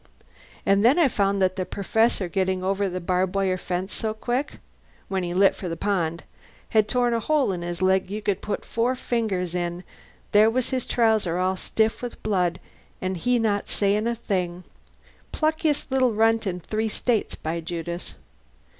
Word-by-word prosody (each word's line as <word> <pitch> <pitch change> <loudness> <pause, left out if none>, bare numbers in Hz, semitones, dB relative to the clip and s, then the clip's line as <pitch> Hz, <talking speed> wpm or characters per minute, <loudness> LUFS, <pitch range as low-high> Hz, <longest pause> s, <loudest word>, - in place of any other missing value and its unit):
An' 195 0 +4
then 240 +8 +5
I 335 -4 +5
found 200 -4 +1
that 185 0 +1
the 185 - 0
Perfessor, 205 +1 +1
gettin' 185 0 0
over 195 +1 0
the 185 0 -3
barb 185 +2 0
wire 190 -2 +2
fence 185 +1 -3
so 220 -1 -2
quick 245 +5 -2 0.6
(when 190 -1 0
he 175 -1 -3
lit 195 +1 +5
for 185 - -5
the 165 - -4
pond) 170 -4 -1 0.5
had 215 -1 +3
torn 245 0 +1
a 230 - +1
hole 285 0 +2
in 180 -2 -3
his 175 +1 -3
leg 190 0 +2
you 210 +2 -3
could 205 -3 -1
put 210 - -3
four 240 +3 0
fingers 210 -9 -1
in. 175 0 -2 0.5
There 210 +2 +6
was 250 +3 -1
his 255 -2 -1
trouser 220 -7 +2
all 185 +1 +1
stiff 220 +4 0
with 245 -1 -7
blood, 180 -5 +1 0.4
an' 185 0 -2
he 245 +8 +1
not 210 -3 0
sayin' 205 +2 +1
a 235 - 0
thing. 185 -6 -2 0.7
Pluckiest 310 -2 0
little 260 -3 +3
runt 225 0 +2
in 180 -1 -2
three 220 +5 -2
States, 225 0 -1
by 160 +2 -3
Judas! 170 +1 -5
200 Hz, 180 wpm, -25 LUFS, 185-225 Hz, 0.7 s, There